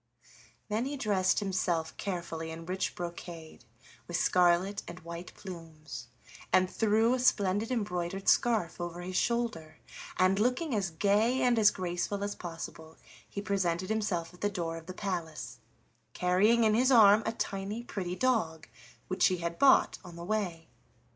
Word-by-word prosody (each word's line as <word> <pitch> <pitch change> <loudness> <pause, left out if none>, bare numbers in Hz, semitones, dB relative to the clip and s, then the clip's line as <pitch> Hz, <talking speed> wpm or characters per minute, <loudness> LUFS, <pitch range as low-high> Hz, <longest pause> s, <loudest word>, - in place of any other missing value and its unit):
Then 220 +3 -1
he 285 +1 -3
dressed 205 -5 +1
himself 180 -5 -1
carefully 170 -4 -4
in 165 +1 -7
rich 185 +2 -2
brocade, 170 -5 -8 0.4
with 175 - -2
scarlet 180 +3 +3
and 175 +1 -8
white 170 +1 -8
plumes, 160 -8 -9 0.4
and 185 0 +4
threw 220 +4 +2
a 255 - 0
splendid 205 -3 +2
embroidered 195 -5 -2
scarf 215 -9 +2
over 175 0 -5
his 185 +1 -6
shoulder, 225 -10 -1 0.4
and, 185 +2 +3
looking 255 +6 +1
as 200 -4 0
gay 210 +9 +2
and 245 -2 +3
as 210 -1 +7
graceful 185 +2 -3
as 205 0 -2
possible, 165 -2 -8 0.3
he 200 - -5
presented 185 -2 -1
himself 200 -6 -1
at 180 - -17
the 205 - +1
door 170 -4 -3
of 165 0 -10
the 185 - -7
palace, 160 - -4 0.6
carrying 200 +6 +3
in 215 -1 +4
his 255 +4 +3
arm 215 -3 +7
a - - +1
tiny 205 0 -4
pretty 180 -6 -4
dog 185 -11 0 0.4
which 185 - +3
he 185 - 0
had 170 0 -4
bought 275 -1 +5
on 175 -2 -11
the 170 0 -7
way. 180 -6 -2
185 Hz, 155 wpm, -30 LUFS, 170-215 Hz, 0.6 s, as